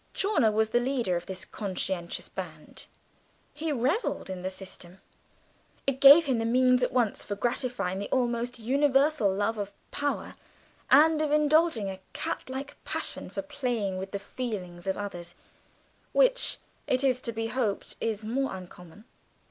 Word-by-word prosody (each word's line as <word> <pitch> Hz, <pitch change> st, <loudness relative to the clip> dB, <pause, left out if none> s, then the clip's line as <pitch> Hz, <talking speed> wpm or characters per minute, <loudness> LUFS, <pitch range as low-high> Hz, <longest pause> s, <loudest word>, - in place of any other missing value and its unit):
Chawner 305 Hz, -, +2 dB
was 220 Hz, +1 st, +1 dB
the 240 Hz, -, +3 dB
leader 245 Hz, -7 st, 0 dB
of 175 Hz, 0 st, -4 dB
this 190 Hz, -1 st, -5 dB
conscientious 190 Hz, -3 st, -4 dB
band; -, -, -8 dB, 0.7 s
he 315 Hz, +1 st, -3 dB
revelled 270 Hz, -, 0 dB
in 185 Hz, -1 st, -5 dB
the 185 Hz, -, -2 dB
system. 185 Hz, -1 st, -9 dB, 0.9 s
It 275 Hz, -1 st, 0 dB
gave 285 Hz, +4 st, +10 dB
him 260 Hz, -5 st, +1 dB
the -, -, 0 dB
means 255 Hz, +2 st, +4 dB
at 250 Hz, -, +1 dB
once 240 Hz, -6 st, 0 dB
of 205 Hz, 0 st, -3 dB
gratifying 240 Hz, -6 st, -1 dB
the 205 Hz, -, -5 dB
almost 245 Hz, -1 st, 0 dB
universal 270 Hz, -1 st, +3 dB
love 205 Hz, +3 st, -1 dB
of 205 Hz, 0 st, -3 dB, 0.2 s
power 285 Hz, 0 st, -2 dB, 0.6 s
and 310 Hz, +3 st, +6 dB
of 305 Hz, -1 st, 0 dB
indulging 300 Hz, -6 st, +3 dB
a 190 Hz, -, -8 dB
catlike 265 Hz, +2 st, -5 dB
passion -, -, -2 dB
for 295 Hz, -, -4 dB
playing 245 Hz, -10 st, -2 dB
with 190 Hz, +1 st, -5 dB
the 200 Hz, -, -3 dB
feelings 195 Hz, -5 st, -6 dB
of 190 Hz, -, 0 dB
others, 175 Hz, -4 st, -6 dB, 0.8 s
which, -, -, +3 dB, 0.3 s
it 255 Hz, +1 st, +1 dB
is 255 Hz, -2 st, +2 dB
to 235 Hz, -, -2 dB
be 225 Hz, 0 st, -3 dB
hoped, 225 Hz, -6 st, -2 dB
is 220 Hz, -1 st, -2 dB
more 260 Hz, 0 st, -1 dB
uncommon. 180 Hz, +2 st, -12 dB
235 Hz, 155 wpm, -28 LUFS, 195-275 Hz, 0.9 s, gave